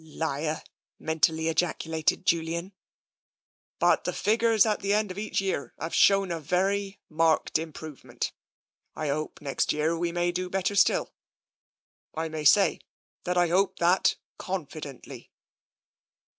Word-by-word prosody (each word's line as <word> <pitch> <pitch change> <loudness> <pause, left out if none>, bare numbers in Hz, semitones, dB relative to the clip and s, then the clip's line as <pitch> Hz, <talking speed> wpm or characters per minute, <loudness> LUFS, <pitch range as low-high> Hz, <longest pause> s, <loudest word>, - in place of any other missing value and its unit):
("Liar!" 155 0 -3 0.3
mentally 160 0 +1
ejaculated 160 0 0
Julian.) 170 +3 0 0.5
" - - -74 0.3
But - - +3
the - - -2
figures 225 0 +3
at 215 -1 0
the 200 0 0
end 210 -2 +1
of 185 - -6
each 215 - -1
year 190 -7 -3
have 165 +2 -5
shown 195 -2 +4
a 165 - -2
very 195 +5 -1
marked 160 0 +2
improvement. 160 -3 -6 0.6
I 155 -2 -3
hope 155 +2 -3
next 140 -2 0
year 155 +2 0
we 170 +1 -1
may 175 0 0
do 180 +1 -3
better 195 +2 -1
still. 200 - +3 1.0
I 160 +1 -2
may 155 -1 -5
say, 200 +7 +5 0.5
that 180 0 -1
I 175 -1 +3
hope 190 +3 +2
so 175 +2 +4 0.4
confidently." 155 -7 -7
170 Hz, 135 wpm, -27 LUFS, 160-195 Hz, 1.0 s, say